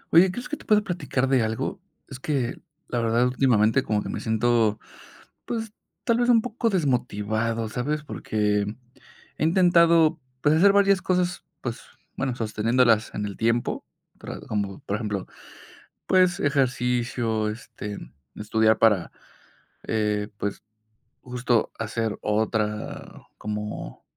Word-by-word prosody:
Oye, 185 +3 +8
¿crees 245 +6 -6
que 300 - -4
te - - -15
pueda 210 -1 +4
platicar 145 -8 -1
de 130 -2 +3
algo? 110 0 -2 0.3
Es - - -9
que 130 -4 -2 0.3
la 120 - -1
verdad 115 +2 +2
últimamente 125 -2 +3
como 105 -3 -1
que - - -6
me - - -3
siento, 110 -1 +2 0.7
pues, 225 -2 -4 0.3
tal 235 0 +2
vez 240 0 +2
un 235 -2 +6
poco, 235 -1 -1
desmotivado, 115 - 0
¿sabes? 145 +7 -2
Porque 105 -7 -1 0.7
he - - 0
intentado, 170 -1 +5 0.2
pues, 150 +1 +4
hacer 195 +5 +6
varias 200 -1 +4
cosas, 180 -1 0 0.2
pues, 120 0 -4 0.4
bueno, 135 -2 -1
sosteniéndolas 115 0 +2
en 105 - -2
el 100 -1 -6
tiempo, 115 +1 0 0.3
para - - -7
como, 100 -2 -3
por 100 - -2
ejemplo, 105 -4 -3 0.8
pues, 185 -1 +4
ejercicio, 125 -5 0
este, 105 -3 -7 0.4
estudiar 110 +1 +2
para, 105 -6 +3 0.7
eh, 105 -1 0
pues, 100 0 -3 0.6
justo 125 -2 0
hacer 110 -1 -2
otra 105 0 -2 0.2
como 105 0 -5
120 Hz, 130 wpm, -25 LUFS, 110-155 Hz, 0.8 s, Oye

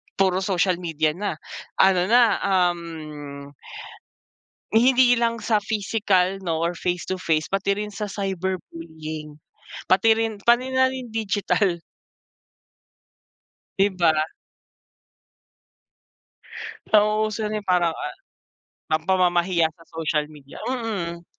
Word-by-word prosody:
puro 190 -1 +2
social 185 -2 +1
media 160 -3 0
na 185 0 -3 0.4
ano 185 -1 +4
na, 240 +2 +6 0.2
um 160 -6 -2 1.2
Eh, 220 - +5
hindi 245 -1 +5
lang 230 -1 0
sa 215 -2 +2
pisikal 200 -3 0
'no 165 -3 -2
or 170 0 -2
face 180 -1 -1
to 185 0 -4
face, 155 -2 0
pati 195 0 +1
rin 210 0 -4
sa 205 +1 -4
cyberbullying, 165 -6 -5 0.6
pati 220 +4 +5
rin, 225 -2 -2
pati 240 +4 +2
na 260 0 +4
rin 255 -3 -6
digital. 205 -4 0 2.0
'Di 195 +1 +5
ba. 170 -3 +4 2.8
Nauuso 215 0 +2
na 215 0 -2
yung 200 - -25
parang, 175 -2 +2
ah, - - -5 0.8
ang 155 0 0
pamamahiya 175 -2 +2
sa 165 - -18
social 155 -2 -1
media, 140 -2 -13
mm. 200 -9 -3
190 Hz, 110 wpm, -23 LUFS, 170-215 Hz, 2.8 s, na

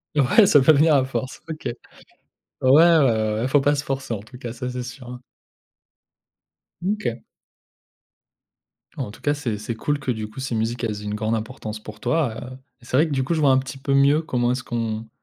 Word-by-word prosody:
Ouais 145 - +5
ça 145 - +6
peut 145 - +6
venir 150 +1 +4
à 130 - +3
force, 130 0 -5
OK. 155 -1 -7
Ouais, - - -1 0.9
ouais, 130 - +5 0.3
ouais, 110 -6 +2
ouais, 110 - -2
il 130 - 0
faut 145 +1 +4
pas 145 +2 +2
se 145 0 -3
forcer 135 -3 -3
en 100 - -5
tout 125 +4 -13
cas, 120 -2 -6
ça 125 +1 -5
c'est 125 0 -4
sûr, 125 +1 -9
hein. 125 0 -8 1.6
Mmh, 190 +4 0
OK. 125 - -4 1.7
En 105 - -4
tout - - -15
cas, 145 - +1
c'est 125 -7 -3
c'est 110 +2 -5
cool 145 +6 -1
que, 135 -2 -2
du 110 -2 -4
coup, 110 - -11
ces 130 -3 -3
musiques, 115 +2 -2
elles 105 -2 -2
aient - - -9
une 105 - -3
grande 110 +1 -1
importance 110 -1 -6
pour 105 -1 -10
toi, 145 -6 0 0.2
heu - - -11 0.2
et 120 - -19
c'est 125 - -3
vrai 155 +5 +4
que, - - -7
du 135 -2 0
coup, 170 - -1
je 160 - 0
vois 140 -2 +5
un 130 - +5
petit 130 0 -4
peu 140 +1 -1
mieux 140 +3 +4
comment 125 -6 0
est-ce 130 +1 -2
qu'on 115 -2 -3
125 Hz, 235 wpm, -23 LUFS, 115-140 Hz, 1.7 s, ça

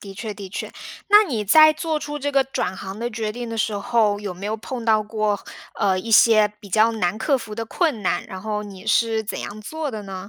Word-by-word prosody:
的 195 -1 -9
确， 215 0 -6
的 195 -2 -8
确， 190 - -6 0.4
那 415 +1 +8
你 240 - -2
在 310 +9 +7
做 310 0 -2
出 295 0 -5
这 285 +1 -2
个 275 -1 +4
转 190 -8 -3
行 195 +2 -7
的 235 +1 -2
决 220 -1 -3
定 240 +1 -6
的 225 - -5
时 215 -1 0
候， 210 -1 +1
有 200 -3 -5
没 185 - -9
有 215 +2 -2
碰 235 +2 -6
到 215 -1 +3
过， 210 -1 -1 0.4
呃， 190 -2 +1
一 225 +4 -6
些 215 -1 +6
比 205 -2 -13
较 220 +3 +4
难 195 -2 -1
克 270 +4 +1
服 215 -3 -8
的 230 +1 -4
困 270 - -1
难， 175 - 0
然 190 -1 -8
后 210 -1 -2
你 195 0 -11
是 225 0 +2
怎 215 - -5
样 215 +1 -7
做 315 +7 -4
的 215 -2 -6
呢？ 195 0 -8
215 Hz, 265 characters per minute, -22 LUFS, 205-240 Hz, 0.4 s, 那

